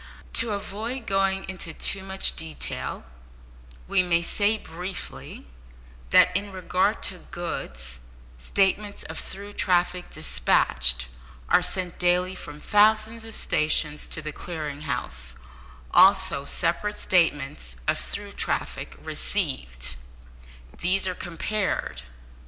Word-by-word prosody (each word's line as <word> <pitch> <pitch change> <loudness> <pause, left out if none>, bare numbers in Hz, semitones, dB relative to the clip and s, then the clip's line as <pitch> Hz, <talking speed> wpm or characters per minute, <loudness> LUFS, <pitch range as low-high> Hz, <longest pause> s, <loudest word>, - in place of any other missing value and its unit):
To 230 - +4
avoid 220 +5 -4
going 195 -2 +1
too 170 +4 -2
much 190 0 +2
into - - -6
detail, 160 -1 -4 0.8
we - - +4
may 170 -1 +2
say, 205 +5 +2
briefly, 180 0 -7 0.6
that 180 - +6
in 200 +1 -1
regard 185 +2 +1
to 185 - -2
goods, 60 - -5 0.4
statements 200 - +1
of 160 - -6
through 200 +1 -8
traffic 180 -1 +1
despatched 65 - +3 0.4
are - - +6
sent 180 0 -1
daily 180 +1 +3
from 150 -5 -9
thousands 215 +4 +3
of 225 -1 -9
stations 150 -1 +1
to 155 - -2
the 150 - -3
Clearing 150 -4 -5
House, 65 - -3 0.6
also 140 - +5
separate 180 +7 0
statements 135 - +1
of - - +2
through - - -6
traffic - - -2
received. - - -2 0.8
These 190 +2 +3
are 185 - 0
compared. 175 - -2
180 Hz, 110 wpm, -26 LUFS, 150-195 Hz, 0.8 s, that